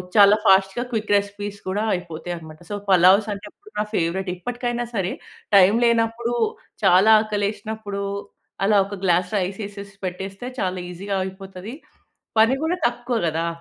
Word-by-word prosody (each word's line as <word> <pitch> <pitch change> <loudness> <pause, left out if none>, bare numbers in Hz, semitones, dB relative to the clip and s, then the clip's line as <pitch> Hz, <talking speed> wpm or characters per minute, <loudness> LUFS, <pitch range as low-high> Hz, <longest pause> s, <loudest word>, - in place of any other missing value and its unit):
చాలా 205 0 +8
ఫాస్ట్‌గా 195 +4 +4
quick 215 -3 -2
recipes 205 0 -2
కూడా 205 +3 -1
అయిపోతాయి 175 0 -6
అనమాట. 155 -1 -12
సో, - - -1
పలావ్సంటే 195 +3 +4 0.3
నా 210 - +2
ఫేవరెట్. 180 +3 -1
ఇప్పటికైనా 240 +3 -3
సరే, 190 -2 0 0.4
టైమ్ 195 +3 +6
లేనప్పుడు 230 +1 +1 0.5
చాలా 190 +5 +6
ఆకలేసినప్పుడూ, 210 -1 -3 0.6
అలా 210 +1 +4
ఒక 200 - -9
గ్లాస్ 180 +1 +2
రైసేసేసి 200 +1 -5
పెట్టేస్తే 190 +5 -5
చాలా 185 -1 -1
ఈజీగా 195 +3 -3
అయిపోతది. 190 +3 -8 0.7
పని 225 +4 +5
గూడా 340 +3 0
తక్కువ 240 0 -3
గదా! 165 +1 -1
200 Hz, 130 wpm, -23 LUFS, 185-220 Hz, 0.7 s, చాలా